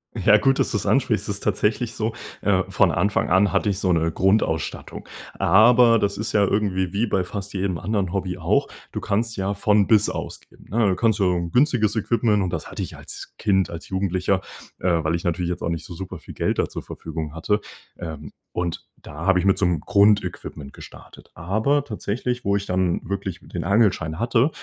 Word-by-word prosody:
Ja, 105 0 +5
gut, 135 +5 +2
dass - - 0
du 110 - +1
das 100 - -4
ansprichst. 130 -5 +1
Es 100 - -1
ist - - -4
tatsächlich 105 +3 0
so, 110 +1 -2 0.3
äh, 95 -2 +2
von 95 -2 +3
Anfang 100 +3 0
an 95 +3 +4
hatte 105 - +1
ich 100 - -1
so 95 -2 +1
'ne 80 -1 +1
Grundausstattung. 95 -4 -1 0.3
Aber 115 +4 +6
das 100 -1 -1
ist 110 - -3
ja 105 -1 +3
irgendwie 95 -3 0
wie 110 +4 +1
bei 95 -3 +1
fast 100 +2 -6
jedem 95 -2 -1
anderen 100 -2 -2
Hobby 95 -2 -2
auch. 80 -1 +1 0.3
Du - - -3
kannst 110 +2 -1
ja 95 +1 -1
von 105 0 +3
bis 105 -2 +4
ausgeben, - - -8
ne? 110 +1 +2
Du 95 - +2
kannst 110 +2 +2
so 95 -2 +3
'n 85 -1 -3
günstiges 125 - +2
Equipment 110 -1 +1
Und 90 - -1
das - - -5
hatte - - -5
ich - - -7
als - - -9
Kind, 95 -3 +1
als 85 0 -8
Jugendlicher, 95 0 0 0.4
äh, 85 -3 +1
weil 80 - 0
ich 85 - -4
natürlich 85 0 -1
jetzt 85 - -5
auch - - -2
nicht 85 -1 -3
so 85 - -9
super 95 +2 -7
viel - - -11
Geld - - -1
da - - +1
zur - - -6
Verfügung 80 -2 -6
hatte. 105 +6 0 0.4
Ähm, 75 -4 -7 0.2
und 85 -1 -3
da 80 +3 -9
habe 95 -1 +5
ich 90 - -1
mit 95 - +4
so 100 - +2
'm 90 -2 +1
Grundequipment 100 -8 +1
gestartet. - - -14
Aber 110 - 0
tatsächlich, 125 0 -3
wo 100 0 +1
ich 100 - -2
dann 90 -2 0
wirklich 95 -2 -4
den 85 - -5
Angelschein 95 -6 +1
hatte 120 +4 +2
100 Hz, 210 wpm, -23 LUFS, 90-105 Hz, 0.4 s, Aber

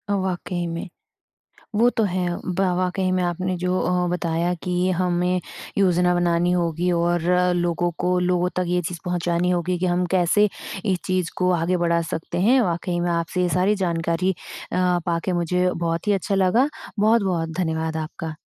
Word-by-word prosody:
वाक़ई 180 -2 -2
में। 165 0 -4 0.9
वो 230 +3 +4
तो 225 - 0
है 180 -2 -1 0.2
ब 185 0 -2 0.2
वाक़ई 185 +1 0
में 185 0 +1
आपने 185 +1 -1
जो 180 +1 0
अ, 180 0 +1
बताया 170 0 0
कि 180 +1 0
हमें 180 0 +1 0.4
योजना 180 -2 +3
बनानी 175 0 +2
होगी 175 0 0
और 170 0 +1 0.3
लोगों 175 0 0
को 180 0 +1
लोगों 180 0 +1
तक 180 - +1
ये 180 0 +1
चीज़ 175 - -6
पहुँचानी 175 0 0
होगी 180 0 0
कि 185 - 0
हम 180 0 +1
कैसे 185 +4 +4 0.4
इस 190 -4 +1
चीज़ 185 -2 0
को 180 0 +2
आगे 175 +1 +1
बढ़ा 170 -1 +1
सकते 165 +2 -4
हैं? 245 +7 +5
वाक़ई 175 -3 -1
मैं 175 0 0
आपसे 170 +2 -1
ये 180 - +2
सारी 185 +4 +2
जानकारी 170 +2 0 0.4
अ, - - -1 0.3
पाके 170 +2 -1
मुझे 180 +1 +1
बहुत 165 +2 -2
ही - - +4
अच्छा 200 +1 -1
लगा। 195 +8 +3 0.3
बहुत-बहुत 195 -6 +2
धन्यवाद 160 -2 -1
आपका। 160 0 -5
180 Hz, 170 wpm, -23 LUFS, 170-185 Hz, 0.9 s, हैं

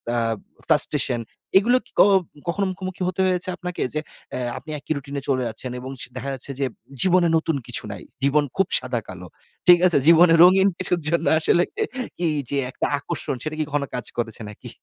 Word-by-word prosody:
আ - - +2 0.5
frustration, 120 - +3 0.4
এগুলো 235 +6 +4
কি - - -23
ক - - +10 0.5
কখনো 195 +4 0
মুখোমুখি 185 0 -7
হতে 185 0 -4
হয়েছে 180 0 0
আপনাকে, 180 -1 -5
যে 155 - 0 0.3
অ্যা 130 - -3 0.2
আপনি 155 - -11
একই 145 - -9
রুটিনে 140 0 -5
চলে 130 -2 +1
যাচ্ছেন, 115 +3 -6
এবং 130 +2 -7
স - - -3
দেখা 130 +2 -4
যাচ্ছে 135 +1 -5
যে, 140 - +1 0.4
জীবনে 180 -2 +4
নতুন 160 -1 -1
কিছু - - -4
নাই, - - -8 0.2
জীবন 145 +2 +3
খুব 195 -2 +3
সাদা 125 -2 -2
কালো, 90 -1 -9 0.4
ঠিক 175 -1 +9
আছে। 175 - +3
জীবনের 165 0 +7
রঙিন 190 +2 +6
কিছুর 180 -1 +1
জন্য 170 0 0
আসলে 170 +2 +3 0.6
এই 155 -2 +1
যে 140 - -1
একটা - - -2
আকর্ষণ, 140 - -4
সেটা 155 0 -4
কি - - +2
কখনো 145 -1 -1
কাজ 125 -3 -4
করেছে 115 -1 -3
নাকি? 105 - -10
155 Hz, 190 wpm, -23 LUFS, 130-180 Hz, 0.6 s, ক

